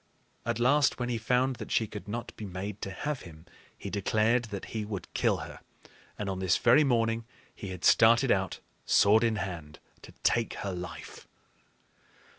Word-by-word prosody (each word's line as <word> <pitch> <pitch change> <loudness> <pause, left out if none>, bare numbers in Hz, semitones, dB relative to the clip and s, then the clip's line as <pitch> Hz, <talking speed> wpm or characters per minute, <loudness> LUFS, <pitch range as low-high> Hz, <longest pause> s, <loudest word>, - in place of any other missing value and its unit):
At - - 0
last 135 +3 +3
when 125 0 -2
he 120 -2 -1
found 125 +3 +1
that 110 - -8
she 110 - +2
could 105 -2 -9
not 115 +3 -5
be - - -8
made 95 +2 -6
to - - -4
have 145 +7 -4
him, 80 -1 -13 0.3
he 100 - -7
declared 110 +4 +1
that 100 -3 -6
he 110 -1 -2
would 105 -4 -6
kill - - +2
her; - - -11 0.6
and 105 - -4
on 95 -1 -3
this 95 -1 +2
very 125 +6 +5
morning 115 -3 +1 0.3
he 100 - -8
had 90 -2 -5
started 115 +3 +5
out, 95 -1 0 0.2
sword 110 +3 +5
in 115 -1 +2
hand, 85 -7 -5 0.2
to - - -12
take 115 -1 +1
her 100 - -2
life. 90 0 -8
110 Hz, 180 wpm, -29 LUFS, 95-120 Hz, 0.6 s, very